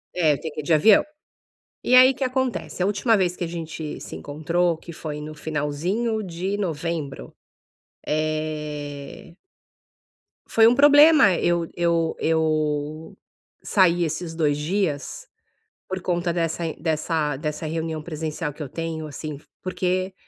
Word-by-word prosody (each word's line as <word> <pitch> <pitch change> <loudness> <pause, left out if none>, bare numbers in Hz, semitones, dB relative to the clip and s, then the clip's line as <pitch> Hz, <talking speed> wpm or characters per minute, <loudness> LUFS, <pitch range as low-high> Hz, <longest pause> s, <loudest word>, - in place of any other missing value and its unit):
É, 160 -4 +3
eu 140 - -4
tenho 160 -2 -6
que - - -4
ir - - -13
de 160 - +1
avião. 200 +7 +6 0.8
E 255 - +4
aí 255 +1 +9
o 265 - -7
que 270 - -3
acontece? 255 -7 -2
A - - +2
última 210 +2 +2
vez 180 -2 +1
que - - -4
a - - -2
gente 160 -2 -6
se - - -8
encontrou, 165 +4 -1
que 170 +1 -11
foi 150 -2 -6
no 155 +1 -7
finalzinho 160 +10 -2
de 185 +3 -3
novembro, 165 -5 -4 0.7
eh 150 -1 -4 1.1
foi 225 0 +5
um 240 - +5
problema 290 - +7
eu 170 -1 +1
eu 170 -1 +1
eu 155 +2 -1 0.5
sair 175 -3 +3
esses 165 +1 -4
2 150 -3 +1
dias 180 - -2 0.6
por 190 0 -3
conta 175 -1 0
dessa 165 -1 -1
dessa 155 -2 0
dessa 150 +2 -4
reunião 160 0 -3
presencial 155 -1 -4
que 150 - -8
eu 140 - -5
tenho, 165 0 -4
assim, 150 0 -6 0.2
porque 185 0 -1
165 Hz, 145 wpm, -23 LUFS, 155-185 Hz, 1.1 s, aí